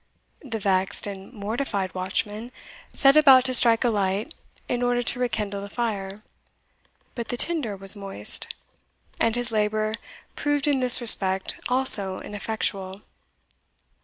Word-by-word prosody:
The 245 Hz, -6 st, -6 dB
vexed 190 Hz, -2 st, 0 dB
and 195 Hz, 0 st, -9 dB
mortified 205 Hz, -3 st, -4 dB
watchman 205 Hz, +5 st, -4 dB, 0.4 s
set 275 Hz, +1 st, +3 dB
about 270 Hz, -4 st, +6 dB
to 255 Hz, -, -1 dB
strike 230 Hz, -1 st, +5 dB
a 245 Hz, -, +1 dB
light 205 Hz, -, -3 dB, 0.3 s
in 245 Hz, -, -3 dB
order 245 Hz, 0 st, 0 dB
to 245 Hz, +2 st, 0 dB
rekindle 210 Hz, -5 st, -3 dB
the 200 Hz, -, -9 dB
fire 205 Hz, -3 st, -5 dB, 0.9 s
but 235 Hz, -2 st, -7 dB
the 245 Hz, -, -4 dB
tinder 265 Hz, -10 st, -1 dB
was 195 Hz, +1 st, +3 dB
moist, 195 Hz, -, +1 dB, 0.7 s
and 230 Hz, 0 st, +1 dB
his 245 Hz, -1 st, -4 dB
labour 215 Hz, 0 st, -1 dB, 0.4 s
proved 290 Hz, 0 st, -1 dB
in 285 Hz, -2 st, +1 dB
this 250 Hz, 0 st, +6 dB
respect 190 Hz, -5 st, +3 dB
also 215 Hz, -7 st, +3 dB
ineffectual. 200 Hz, -2 st, -5 dB
215 Hz, 130 wpm, -23 LUFS, 195-245 Hz, 0.9 s, about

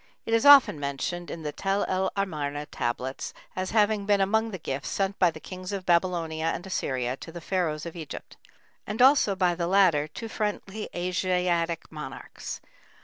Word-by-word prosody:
It 225 Hz, -, -2 dB
is 230 Hz, +4 st, +4 dB
often 280 Hz, -, +8 dB
mentioned 145 Hz, +5 st, -3 dB
in 165 Hz, -, -6 dB
the 150 Hz, -, -2 dB
Tel 195 Hz, +6 st, 0 dB
el 190 Hz, 0 st, 0 dB
Amarna 150 Hz, -7 st, -2 dB
tablets 130 Hz, -1 st, -3 dB, 0.2 s
as 185 Hz, 0 st, -2 dB
having 210 Hz, -1 st, +2 dB
been 205 Hz, -1 st, +4 dB
among 220 Hz, +3 st, +2 dB
the 195 Hz, -, -5 dB
gifts 140 Hz, -4 st, -4 dB
sent 195 Hz, 0 st, -1 dB
by 180 Hz, -, +5 dB
the -, -, -8 dB
kings 185 Hz, 0 st, -7 dB
of 195 Hz, -2 st, -4 dB
Babylonia 170 Hz, -2 st, +1 dB
and 175 Hz, -, -3 dB
Assyria 130 Hz, -9 st, -1 dB
to 165 Hz, -, -9 dB
the 170 Hz, -, -7 dB
Pharaohs 165 Hz, -4 st, -1 dB
of 170 Hz, -, -7 dB
Egypt, 155 Hz, -4 st, -8 dB, 0.5 s
and 210 Hz, +3 st, -4 dB
also 255 Hz, -6 st, +6 dB
by 180 Hz, -2 st, +2 dB
the 170 Hz, 0 st, -2 dB
latter 175 Hz, -6 st, +4 dB
to 225 Hz, +9 st, -7 dB
friendly 210 Hz, -1 st, -3 dB
Asiatic 175 Hz, -2 st, 0 dB
monarchs. 150 Hz, -4 st, -7 dB
180 Hz, 175 wpm, -27 LUFS, 160-200 Hz, 0.5 s, often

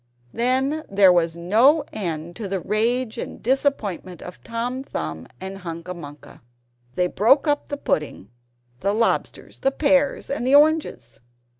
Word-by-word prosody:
Then 265 Hz, +6 st, 0 dB
there 195 Hz, -2 st, +6 dB
was 170 Hz, -2 st, +1 dB
no 230 Hz, -, +4 dB
end 170 Hz, -3 st, -4 dB
to 215 Hz, -, -5 dB
the 195 Hz, 0 st, -2 dB
rage 225 Hz, +6 st, 0 dB
and -, -, -6 dB
disappointment 220 Hz, -, -1 dB
of 180 Hz, -, -11 dB
Tom 245 Hz, +3 st, -3 dB
Thumb 80 Hz, -, -5 dB
and 190 Hz, +1 st, -7 dB
Hunca 170 Hz, 0 st, -6 dB
Munca. 145 Hz, -4 st, -12 dB, 0.5 s
They 180 Hz, -, +2 dB
broke 240 Hz, -, +3 dB
up 290 Hz, 0 st, 0 dB
the 285 Hz, -, -4 dB
pudding, 150 Hz, -, -3 dB, 0.5 s
the 200 Hz, +8 st, 0 dB
lobsters, 230 Hz, +2 st, -1 dB
the 270 Hz, -, +2 dB
pears 280 Hz, 0 st, +1 dB
and 265 Hz, -3 st, -3 dB
the 270 Hz, -, +5 dB
oranges. 295 Hz, -, +2 dB
215 Hz, 145 wpm, -23 LUFS, 175-270 Hz, 0.5 s, there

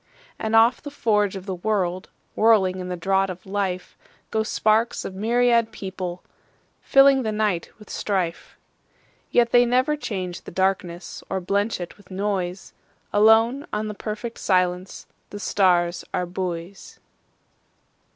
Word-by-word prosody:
And 220 Hz, 0 st, -1 dB
off 230 Hz, +2 st, +5 dB
the 290 Hz, -, -7 dB
forge 210 Hz, -8 st, +1 dB
of 190 Hz, -1 st, -7 dB
the 195 Hz, -, -3 dB
world, 185 Hz, -1 st, -1 dB, 0.3 s
Whirling 200 Hz, -4 st, +4 dB
in 180 Hz, 0 st, -5 dB
the 180 Hz, -, -3 dB
draught 195 Hz, +2 st, +1 dB
of 180 Hz, 0 st, -8 dB
life, 190 Hz, -2 st, -3 dB, 0.4 s
Go 220 Hz, -, +1 dB
sparks 220 Hz, +1 st, +1 dB
of -, -, -5 dB
myriad 235 Hz, +2 st, +2 dB
people, 185 Hz, -3 st, -6 dB, 0.6 s
fillingThe 275 Hz, -4 st, +5 dB
night 210 Hz, -5 st, -1 dB
with 210 Hz, -, -15 dB
strife. 185 Hz, -5 st, -3 dB, 0.7 s
Yet 235 Hz, -1 st, +3 dB
they 245 Hz, 0 st, +6 dB
never 255 Hz, +5 st, +2 dB
change 185 Hz, -10 st, -5 dB
the -, -, -10 dB
darknessOr 185 Hz, 0 st, -2 dB
blench 200 Hz, +3 st, 0 dB
it 175 Hz, -1 st, -7 dB
with 205 Hz, -3 st, -20 dB
noise; 190 Hz, -1 st, -3 dB, 0.4 s
Alone 225 Hz, +6 st, +4 dB
on 215 Hz, 0 st, -2 dB
the -, -, -4 dB
perfect 215 Hz, +3 st, -6 dB
silenceThe 185 Hz, +2 st, -2 dB
stars 175 Hz, -4 st, +2 dB
are 180 Hz, -, 0 dB
buoys. 180 Hz, +1 st, -6 dB
200 Hz, 130 wpm, -23 LUFS, 185-220 Hz, 0.7 s, they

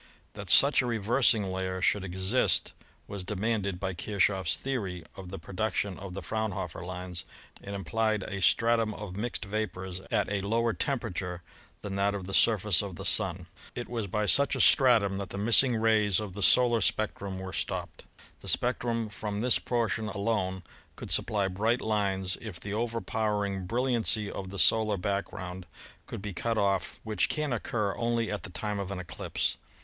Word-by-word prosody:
That -, -, -7 dB
such 140 Hz, -1 st, +8 dB
a 125 Hz, -, -3 dB
reversing 115 Hz, 0 st, +3 dB
layer 95 Hz, 0 st, -3 dB
should 95 Hz, +2 st, +2 dB
exist 95 Hz, +6 st, +1 dB, 0.3 s
was 100 Hz, -2 st, -6 dB
de 105 Hz, +3 st, -4 dB
manded 100 Hz, -3 st, -1 dB
by 95 Hz, -1 st, -2 dB
KirchofY's 95 Hz, -1 st, +1 dB
theory 100 Hz, -10 st, -3 dB
of 95 Hz, -2 st, -9 dB
the 95 Hz, -, -6 dB
production 100 Hz, +2 st, -3 dB
of 95 Hz, -2 st, -8 dB
the 100 Hz, -, -5 dB
Fraunhof 110 Hz, -6 st, -3 dB
er -, -, -7 dB
lines, 90 Hz, 0 st, -5 dB, 0.4 s
and 100 Hz, 0 st, -6 dB
implied 110 Hz, +2 st, 0 dB
a 95 Hz, 0 st, -5 dB
stratum 115 Hz, +2 st, +3 dB
of 105 Hz, -4 st, -7 dB
mixed 110 Hz, +1 st, -3 dB
vapors 95 Hz, -3 st, -4 dB
at -, -, +1 dB
a 100 Hz, -1 st, -1 dB
lower 115 Hz, +3 st, +1 dB
temperature 95 Hz, -11 st, -3 dB, 0.4 s
than 100 Hz, -1 st, -4 dB
that 100 Hz, +1 st, +1 dB
of 95 Hz, -2 st, -5 dB
the 95 Hz, -, -7 dB
surface 105 Hz, -4 st, +4 dB
of 100 Hz, -3 st, -6 dB
the 95 Hz, -, -7 dB
Sun. 95 Hz, -5 st, +2 dB, 0.3 s
It 120 Hz, -, -4 dB
was 115 Hz, -4 st, -3 dB
by 105 Hz, +3 st, -1 dB
such 140 Hz, +6 st, +5 dB
a -, -, -3 dB
stratum 110 Hz, -7 st, +5 dB
that 100 Hz, -, -5 dB
the -, -, -6 dB
missing 115 Hz, +4 st, +5 dB
rays 110 Hz, -3 st, +3 dB
of 105 Hz, -3 st, -5 dB
the 100 Hz, -, -6 dB
solar 120 Hz, +2 st, +5 dB
spectrum 100 Hz, -2 st, 0 dB
were 95 Hz, 0 st, -7 dB
stopped. 90 Hz, -3 st, -4 dB, 0.3 s
The -, -, -12 dB
spectrum 120 Hz, -2 st, 0 dB
from 105 Hz, 0 st, -4 dB
this 125 Hz, +1 st, +3 dB
portion 115 Hz, -2 st, -1 dB
alone 100 Hz, -3 st, -1 dB, 0.4 s
should -, -, -6 dB
supply 100 Hz, -2 st, +1 dB
bright 110 Hz, +6 st, 0 dB
lines 95 Hz, -4 st, -1 dB
if 105 Hz, -7 st, -7 dB
the 100 Hz, -, -6 dB
overpowering 105 Hz, -4 st, -2 dB
bril 120 Hz, +6 st, 0 dB
liancy 115 Hz, -4 st, +1 dB
of 95 Hz, -1 st, -6 dB
the 100 Hz, -, -7 dB
solar 110 Hz, +1 st, +3 dB
background 95 Hz, -1 st, -4 dB, 0.4 s
could 95 Hz, -, -7 dB
be 105 Hz, -2 st, -4 dB
cut 115 Hz, +5 st, -2 dB
off, 100 Hz, -3 st, 0 dB
which 105 Hz, -5 st, 0 dB
can 150 Hz, -4 st, -1 dB
occur 105 Hz, -3 st, -2 dB
only 115 Hz, -1 st, 0 dB
at 105 Hz, -, -3 dB
the 110 Hz, -, -8 dB
time 105 Hz, +2 st, -3 dB
of 100 Hz, -1 st, -4 dB
an 100 Hz, -, -4 dB
eclipse. 90 Hz, -1 st, -3 dB
100 Hz, 180 wpm, -29 LUFS, 95-115 Hz, 0.4 s, such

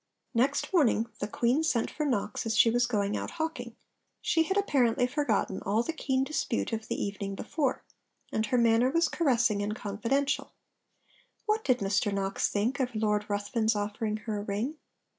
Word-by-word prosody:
Next 265 Hz, +9 st, +1 dB
morning 235 Hz, -, +3 dB
the 205 Hz, -, -2 dB
Queen 245 Hz, +8 st, +1 dB
sent 245 Hz, -8 st, +1 dB
for 300 Hz, -1 st, -2 dB
Knox 210 Hz, -3 st, -1 dB
as 220 Hz, -1 st, 0 dB
she 230 Hz, -, +6 dB
was 240 Hz, +1 st, +2 dB
going 205 Hz, -3 st, 0 dB
out -, -, -3 dB
hawking. 320 Hz, 0 st, -3 dB, 0.4 s
She 325 Hz, -, +2 dB
had 380 Hz, +5 st, 0 dB
apparently 255 Hz, -, +2 dB
forgotten 250 Hz, -8 st, 0 dB
all 215 Hz, +4 st, +1 dB
the 330 Hz, -, -3 dB
keen 265 Hz, -4 st, 0 dB
dispute 270 Hz, -5 st, -2 dB
of 220 Hz, 0 st, -3 dB
the -, -, -2 dB
evening 200 Hz, -1 st, -3 dB
before; 290 Hz, +5 st, -2 dB, 0.5 s
and 220 Hz, 0 st, 0 dB
her 250 Hz, -, +1 dB
manner 235 Hz, +1 st, +4 dB
was 335 Hz, +3 st, +2 dB
caressing 235 Hz, -, +2 dB
and 210 Hz, +1 st, -2 dB
confidential. 260 Hz, +7 st, -1 dB, 0.9 s
What 430 Hz, +1 st, +1 dB
did 255 Hz, -2 st, +2 dB
Mr 200 Hz, +1 st, +1 dB
Knox 195 Hz, -1 st, 0 dB
think 220 Hz, +7 st, 0 dB
of 250 Hz, -3 st, -1 dB
Lord 210 Hz, -1 st, +1 dB
Ruthven's 220 Hz, +2 st, 0 dB
offering 210 Hz, +1 st, -2 dB
her 215 Hz, -2 st, -2 dB
a -, -, -4 dB
ring? 215 Hz, +10 st, -3 dB
230 Hz, 175 wpm, -29 LUFS, 210-275 Hz, 0.9 s, she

